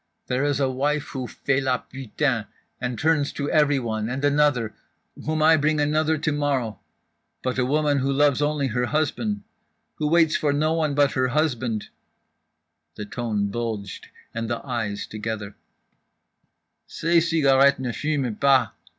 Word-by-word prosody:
There 125 Hz, +2 st, -1 dB
is 145 Hz, -2 st, +1 dB
a 135 Hz, -, +2 dB
wife 145 Hz, +3 st, -1 dB
who 130 Hz, -3 st, -4 dB
fait 140 Hz, +2 st, -1 dB
la 130 Hz, -1 st, +1 dB
putain 130 Hz, -3 st, -2 dB, 0.3 s
and 125 Hz, -1 st, -3 dB
turns, 150 Hz, 0 st, +1 dB
to 140 Hz, 0 st, -3 dB
everyone 125 Hz, -8 st, +1 dB
and 135 Hz, +3 st, -2 dB
another, 145 Hz, -6 st, +2 dB, 0.5 s
whom 155 Hz, 0 st, +1 dB
I 160 Hz, +1 st, +6 dB
bring 155 Hz, +1 st, +1 dB
another 155 Hz, +2 st, +2 dB
tomorrow… 145 Hz, -7 st, -1 dB, 0.6 s
but 130 Hz, 0 st, -1 dB
a 125 Hz, -, +2 dB
woman 145 Hz, 0 st, +2 dB
who 135 Hz, +1 st, 0 dB
loves 145 Hz, 0 st, +3 dB
only 145 Hz, -2 st, 0 dB
her 125 Hz, +1 st, -1 dB
husband, 205 Hz, -, -1 dB, 0.6 s
who 150 Hz, -, 0 dB
waits 165 Hz, -1 st, +4 dB
for 145 Hz, -2 st, +1 dB
no 155 Hz, +2 st, +1 dB
one 155 Hz, -3 st, 0 dB
but 145 Hz, -2 st, +3 dB
her 130 Hz, +2 st, +1 dB
husband—" 125 Hz, -6 st, -1 dB, 1.1 s
(the 105 Hz, -, -6 dB
tone 105 Hz, -2 st, -2 dB
bulged, 110 Hz, -3 st, -4 dB, 0.3 s
and 115 Hz, 0 st, -3 dB
the 120 Hz, +2 st, -3 dB
eyes 110 Hz, -6 st, -3 dB
together) 110 Hz, -1 st, -5 dB, 0.7 s
"— -, -, -48 dB
_Ces 170 Hz, +1 st, +2 dB
cigarettes 140 Hz, -3 st, +4 dB
ne 130 Hz, -2 st, -3 dB
fument 140 Hz, -5 st, -2 dB
pas! 135 Hz, -5 st, +4 dB
140 Hz, 150 wpm, -24 LUFS, 120-150 Hz, 1.1 s, I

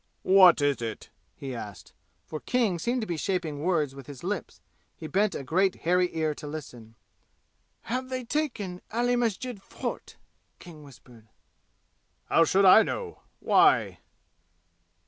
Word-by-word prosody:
"What 185 Hz, -4 st, +6 dB
is 145 Hz, -3 st, +1 dB
it?" 115 Hz, -1 st, -6 dB, 0.2 s
he 135 Hz, -2 st, -7 dB
asked. 105 Hz, -5 st, -9 dB, 0.3 s
For 155 Hz, -, -6 dB
King 225 Hz, -7 st, 0 dB
seemed 240 Hz, +8 st, -1 dB
to -, -, -3 dB
be 170 Hz, -5 st, -4 dB
shaping 165 Hz, -4 st, -2 dB
words 155 Hz, -5 st, 0 dB
with 135 Hz, -2 st, -12 dB
his 140 Hz, 0 st, -10 dB
lips. 195 Hz, +1 st, -4 dB, 0.4 s
He 160 Hz, -, -9 dB
bent 200 Hz, +5 st, 0 dB
a -, -, -5 dB
great 185 Hz, +7 st, +1 dB
hairy 180 Hz, +1 st, +3 dB
ear 155 Hz, -1 st, 0 dB
to 150 Hz, 0 st, -9 dB
listen. 125 Hz, -7 st, -9 dB, 0.9 s
"Have 255 Hz, +2 st, -4 dB
they 255 Hz, -1 st, -4 dB
taken 235 Hz, -10 st, -3 dB
Ali 245 Hz, +2 st, +1 dB
Masjid 240 Hz, -1 st, -2 dB
Fort?" -, -, -7 dB, 0.4 s
King 165 Hz, -3 st, -13 dB
whispered. 125 Hz, -5 st, -17 dB, 1.0 s
"How 165 Hz, -, +4 dB
should 195 Hz, +5 st, +3 dB
I 190 Hz, +4 st, +9 dB
know? 445 Hz, -, -4 dB, 0.2 s
Why?" -, -, +3 dB
180 Hz, 145 wpm, -27 LUFS, 145-215 Hz, 1.0 s, I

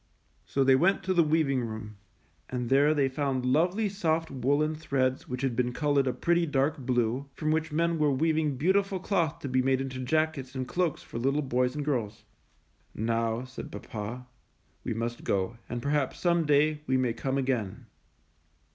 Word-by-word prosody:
So 135 Hz, -, +1 dB
they 135 Hz, 0 st, +5 dB
went 180 Hz, +8 st, +2 dB
to 185 Hz, -, 0 dB
the 175 Hz, -, +5 dB
weaving 150 Hz, -4 st, +2 dB
room, 110 Hz, -2 st, -6 dB, 0.5 s
and 125 Hz, -2 st, -3 dB
there 140 Hz, +3 st, +5 dB
they 140 Hz, -2 st, +3 dB
found 135 Hz, -1 st, -1 dB
lovely 175 Hz, +11 st, +2 dB
soft 165 Hz, -5 st, -1 dB
woolen 145 Hz, +4 st, +1 dB
threads 135 Hz, -4 st, -1 dB
which 125 Hz, +1 st, -4 dB
had 130 Hz, -3 st, 0 dB
been 125 Hz, 0 st, 0 dB
colored 145 Hz, -1 st, +1 dB
a -, -, +2 dB
pretty, 170 Hz, +4 st, +1 dB
dark 145 Hz, +1 st, +1 dB
blue, 125 Hz, +1 st, 0 dB
from 155 Hz, -1 st, -1 dB
which 155 Hz, 0 st, 0 dB
men 165 Hz, +1 st, +1 dB
were 150 Hz, -1 st, +3 dB
weaving 155 Hz, 0 st, +1 dB
beautiful 190 Hz, +5 st, +1 dB
cloth 170 Hz, -5 st, 0 dB
to -, -, -4 dB
be 130 Hz, 0 st, +2 dB
made 130 Hz, 0 st, +2 dB
into 135 Hz, -1 st, -4 dB
jackets 140 Hz, -1 st, -1 dB
and 130 Hz, -1 st, -3 dB
cloaks 175 Hz, +2 st, -1 dB
for 115 Hz, -, -6 dB
little 135 Hz, +4 st, +1 dB
boys 125 Hz, 0 st, 0 dB
and 145 Hz, -1 st, -3 dB
girls. 115 Hz, -8 st, -2 dB, 0.7 s
^^Now,'' 115 Hz, +2 st, -1 dB
said 130 Hz, -, -8 dB
papa, 115 Hz, +3 st, -6 dB, 0.6 s
"we -, -, -3 dB
must 115 Hz, +1 st, -3 dB
go, 100 Hz, +4 st, -1 dB
and 120 Hz, -1 st, -4 dB
perhaps 145 Hz, -2 st, 0 dB
some 170 Hz, -3 st, +2 dB
day 150 Hz, +1 st, +3 dB
we 130 Hz, -, +2 dB
may 125 Hz, -3 st, +1 dB
come 135 Hz, +3 st, -2 dB
again." 125 Hz, -8 st, -2 dB
135 Hz, 180 wpm, -28 LUFS, 125-155 Hz, 0.7 s, they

